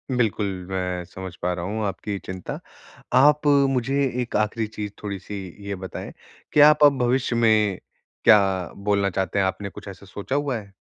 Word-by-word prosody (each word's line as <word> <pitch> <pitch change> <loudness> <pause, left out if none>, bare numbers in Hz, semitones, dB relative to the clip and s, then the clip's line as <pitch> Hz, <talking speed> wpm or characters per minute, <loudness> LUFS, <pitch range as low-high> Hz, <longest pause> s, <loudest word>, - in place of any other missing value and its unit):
बिल्कुल 110 -3 +1 0.2
मैं 90 -1 -2
समझ 95 0 -8
पा 90 - 0
रहा 85 -1 -4
हूँ 110 +3 -3
आपकी 100 0 -3
चिंता। 95 -1 -6 0.5
आप 145 +3 +5 0.2
मुझे 135 +2 0 0.2
एक 120 - -5
आखिरी 110 +1 0
चीज़ 105 -1 -6
थोड़ी-सी 100 0 -5 0.3
ये 100 - -2
बताएँ 95 0 -7 0.4
कि - - +4
आप 150 0 +3
अब 145 -2 +6
भविष्य 125 0 +1
में 110 -4 +3 0.4
क्या 105 - +8 0.4
बोलना 100 0 +1
चाहते 95 +1 -1
हैं, 95 - +3
आपने 95 +2 -3
कुछ 100 - -12
ऐसा 100 +1 -10
सोचा 100 +7 -5
हुआ 140 -3 0
है? 100 -3 -11
105 Hz, 170 wpm, -24 LUFS, 95-120 Hz, 0.5 s, क्या